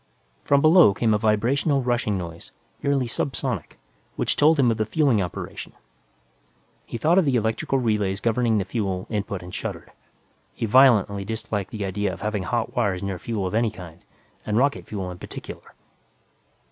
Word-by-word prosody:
From 140 0 +3
below 155 - +6
came 115 -2 +2
a 105 - +2
vibrational 125 +7 +1
rushing 120 -4 0
noise, 85 -2 -8 0.3
nearly 140 -3 +1
subsonic, 130 +3 -3 0.4
which - - 0
told 155 +2 +4
him 125 -4 +4
of 110 - -1
the 110 - 0
fueling 135 -5 +2
operation. 90 -2 -6 1.1
He - - -5
thought 165 +10 +3
of 185 - +2
the 135 -3 +2
electrical 110 +4 0
relays 105 -6 0
governing 115 0 +1
the 100 - 0
fuel 95 -3 -2
input 100 -3 -3
and 90 +1 -10
shuddered. - - -6 0.6
He - - -2
violently 110 -5 +4
disliked 110 -2 -4
the 105 -3 -4
idea 100 +1 -1
of - - -9
having 105 -1 -2
hot 120 +5 -2
wires 100 -7 0
near 95 -2 -3
fuel 110 -2 -3
of 90 - -3
any 115 +1 +2
kind, 90 -5 -12 0.4
and 105 0 -1
rocket 140 +3 +1
fuel 95 -3 -4
in 90 - -10
particular. - - -10
110 Hz, 170 wpm, -24 LUFS, 100-125 Hz, 1.1 s, below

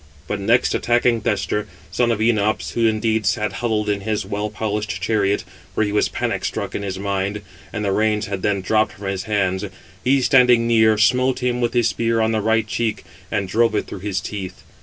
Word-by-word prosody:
But 105 - -2
next, 115 +5 +2
attacking 120 -1 +2
Thestor, 105 0 -1 0.2
son 120 +5 +1
of 115 - +1
Enops 110 -1 +1
(who 115 -1 +2
indeed 110 -1 0
sat 105 0 0
huddled 110 -3 0
in 100 -1 0
his 105 +1 -2
well 105 +1 -3
polished 105 -2 -3
chariot, 100 0 +1 0.3
for - - +2
he 105 - -1
was 105 - +2
panic - - -2
struck - - -3
in - - -3
his 95 -2 -4
mind, 100 +1 -2 0.3
and 105 -2 -3
the 100 - +1
reins 105 +1 +1
had 100 -3 -4
then 100 -1 0
dropped 110 +1 +1
from 100 +1 -10
his 95 -1 -3
hands), 95 -2 0 0.4
he 135 +2 +3
standing 125 -3 +5
near, 110 -2 +4
smote 125 +4 +2
him 125 0 0
with 120 -1 0
his 120 -2 +3
spear 115 +2 0
on 110 0 +2
the 110 -1 0
right 110 +1 +2
cheek, 110 -1 -2 0.3
and 100 -3 -1
drove 115 +3 +2
it - - 0
through - - -8
his 95 0 -2
teeth. 95 -3 -6
105 Hz, 205 wpm, -21 LUFS, 100-115 Hz, 0.4 s, standing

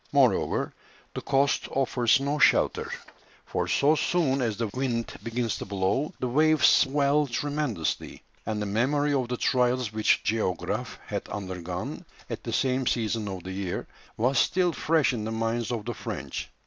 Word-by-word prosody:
Moreover, - - +2 0.4
the - - -4
coast 140 +1 +1
offers 125 -3 +2
no 140 +2 -1
shelter, - - +3 0.5
for - - -2
so 145 +2 +3
soon 155 -4 +1
as 110 -4 -1
the 115 - -1
wind 125 -3 -2
begins 115 -1 -2
to - - -5
blow, 100 +9 0
the 125 - -1
waves 155 +4 +4
swell 140 +2 +3
tremendously, 145 - -2 0.2
and 110 -1 -2
the 105 - -2
memory 140 +8 +1
of 130 -3 +1
the 125 0 -3
trials 125 -3 +1
which 110 0 +2
the - - +2
Géographe 90 -5 -2
had - - -4
undergone 90 -3 -5 0.3
at - - -5
the - - -4
same 130 -1 +1
season 110 -2 0
of 95 -3 -5
the 95 - -6
year 95 -2 -3 0.3
was 125 +3 +2
still 180 -2 +2
fresh 155 -4 +2
in 110 -3 -3
the 110 - -3
minds 115 +1 -1
of 115 -4 -3
the 120 - -3
French. - - -5
120 Hz, 165 wpm, -27 LUFS, 110-140 Hz, 0.5 s, waves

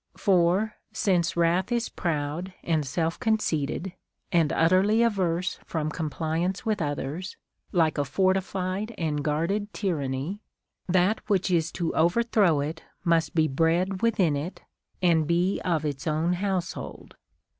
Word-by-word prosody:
For, 190 +3 +2
since 185 -4 +1
wrath 170 +5 +2
is 235 -1 +1
proud 165 +3 -3
and 160 -3 +1
self 165 +4 -1
conceited, 180 -5 -1 0.4
and 165 -4 +3
utterly 190 +7 +4
averse 185 -6 0
from 155 -2 -3
compli 160 +1 -2
ance 190 +4 -1
Avith 220 -4 -1
others, 150 +5 -3 0.3
like 160 -4 +2
a - - +3
fortified 190 - -1
and 150 -3 -1
guarded 170 +8 -1
tyranny, 155 0 -2 0.5
that 185 +4 +3
which 195 -2 +2
is 165 -2 +1
to 170 -3 -2
overthrow 175 -2 +3
it 160 +3 -4 0.2
must 165 -3 +1
be 160 -1 +4
bred 170 +6 +1
within 195 -10 +2
it 155 +6 -5 0.4
and 165 -4 +3
be 175 +3 +1
of 165 -4 0
its 145 -1 -3
own 160 +3 +1
household. 185 0 -4
175 Hz, 135 wpm, -26 LUFS, 160-190 Hz, 0.5 s, utterly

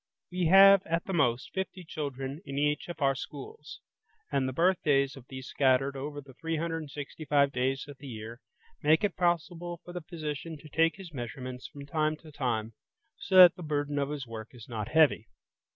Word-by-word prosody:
We 180 -1 0
have, 195 +2 +8
at 165 +1 -1
the 190 - -4
most, 125 -6 +1
fifty 190 -1 -4
children 140 -2 -5
in 140 -7 -6
each 150 +1 0
of 165 -3 -4
our 135 0 +4
schools, 430 - -9 0.5
and 130 -1 +1
the - - -3
birthdays 145 -4 +2
of 130 -2 -13
these 130 -1 -7
scattered 135 0 +2
over 145 +2 -5
the 140 -2 -13
365 155 -2 -1
days 135 +2 -1
of 145 -2 -11
the 140 - -10
year 115 +1 -8 0.4
make 155 +5 +4
it 205 - 0
possible 175 0 -1
for 175 - -9
the 180 - -5
physician 160 -1 -5
to 150 +1 -14
take 165 +2 +2
his 185 -4 -11
measurements 125 0 -6
from 145 -2 -10
time 155 +1 0
to 155 0 -14
time, 115 -6 -2 0.5
so 190 - -2
that 180 -2 +11
the - - -10
burden 145 -2 -1
of 140 0 -1
his 145 -3 -4
work 115 +1 -9
is 115 -3 -12
not 110 -4 -4
heavy. 155 -7 +3
145 Hz, 185 wpm, -29 LUFS, 135-165 Hz, 0.5 s, that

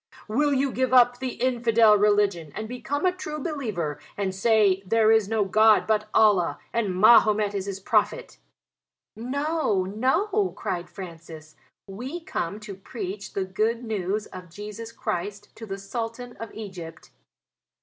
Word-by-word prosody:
"Will 290 +7 +1
you 275 0 +1
give 260 0 +1
up 245 0 +5
the 260 -1 -3
infidel 230 -3 +3
religion 205 -6 +2
and 215 0 -4
become 275 +6 -3
a 365 - +4
true 335 -4 -6
believer 225 - -3 0.2
and 195 -2 -1
say 200 -1 +3
'There 220 +3 +3
is 220 -3 +3
no 220 -2 +1
God 215 +2 +5
but 215 -1 0
Allah, 205 -6 +3 0.2
and 210 -6 0
Mahomet 215 -1 +5
is 200 -1 -3
his 195 -1 -4
prophet?'" - - 0 0.8
"No, 275 - -1
no," 365 - 0
cried 175 -1 -4
Francis, 165 -4 -10 0.3
"we 245 - -6
are 335 - -13
come 195 - -3
to 215 -2 -8
preach 195 0 -7
the 195 - -1
Good 215 +5 -1
News 210 -1 -2
of 180 -1 -11
Jesus 210 +5 -8
Christ 205 +1 -5
to 225 - -9
the 195 -1 -4
Sultan 230 +4 -6
of 225 -2 -7
Egypt." 185 -7 -9
215 Hz, 150 wpm, -25 LUFS, 195-245 Hz, 0.8 s, up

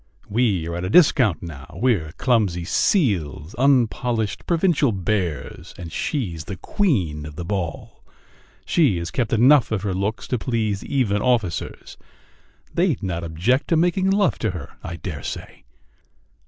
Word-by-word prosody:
"We 100 -7 +1
are 85 - -4
at 90 - -4
a 90 - -2
discount 125 - +4
now.... 80 +1 -9
We're 105 -11 +1
clumsy 100 -9 +1
seals, 90 - +1
unpolished 120 -5 +1
provincial 165 -6 +2
bears, 95 -5 -3
and 85 -2 -8
she's 85 - -3
the 100 - -5
queen 95 - 0
of 75 0 -9
the 85 +1 -5
ball! 90 -3 -4 0.6
She 140 - +3
has 85 +1 -4
kept 120 -4 -1
enough 125 +3 +5
of 105 -3 -1
her 100 -3 -1
looks 100 +4 -2
to 125 - 0
please 110 -5 -1
even 110 -7 0
officers... 115 -9 -1 0.8
They'd 170 - +1
not 85 -3 -2
object 90 - 0
to 165 - +2
making 180 +3 +2
love 200 0 +2
to 110 - 0
her, 85 -7 -7
I 85 - -5
dare 80 - -6
say!" - - -7
105 Hz, 150 wpm, -22 LUFS, 85-130 Hz, 0.8 s, enough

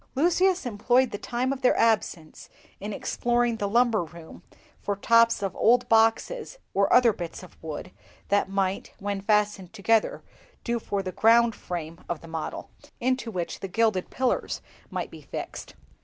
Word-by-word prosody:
Lucius 360 +4 +2
employed 245 +3 +2
the - - -4
time 250 +3 -1
of 270 - -8
their 255 - +3
absence 205 -8 0 0.3
in 205 +2 -5
exploring 240 +2 0
the 205 -2 -2
lumber 230 -3 +3
room 165 0 -12 0.4
for 205 - -2
tops 230 +1 +4
of 195 -2 -2
old 245 +2 +3
boxes 225 - +2 0.2
or 200 0 +2
other 245 -3 +6
bits 175 -1 -7
of 180 - -14
wood 160 +3 -6 0.4
that 200 -1 +2
might, 195 -1 -1
when 200 0 -3
fastened 205 -3 +1
together, 220 +1 +1 0.4
do 235 -1 -1
for 200 -3 -3
the 185 - -4
ground 230 +4 +4
frame 170 -4 -6
of 170 -3 -3
the 165 - -12
model, 160 -1 -5 0.3
into 255 -1 0
which 180 -5 -4
the 195 - -5
gilded 205 -1 +1
pillars 260 -1 -1 0.3
might - - -4
be - - -11
fixed. - - -7
215 Hz, 160 wpm, -26 LUFS, 190-240 Hz, 0.4 s, other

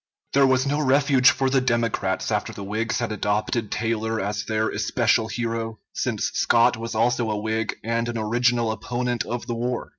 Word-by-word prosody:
There 140 0 +5
was 130 0 +2
no 145 +2 0
refuge 135 -2 +4
for 135 - +1
the 135 0 +2
Democrats 115 -6 0
after - - -1
the 100 - -8
Whigs 110 +3 -2
had 120 -2 -2
adopted 105 +1 -1
Taylor 110 0 -1
as 105 +2 -3
their 110 0 0
especial 110 +1 +1
hero, 115 -1 -3 0.2
since - - -1
Scott 120 +1 +3
was 115 0 -6
also 115 0 +1
a 105 - -1
Whig 110 +1 -2
and 115 +1 -1
an 120 - -3
original 120 +1 +1
opponent 120 +1 -2
of 120 0 -4
the 120 - -3
war. 120 +1 -3
115 Hz, 180 wpm, -24 LUFS, 110-120 Hz, 0.2 s, There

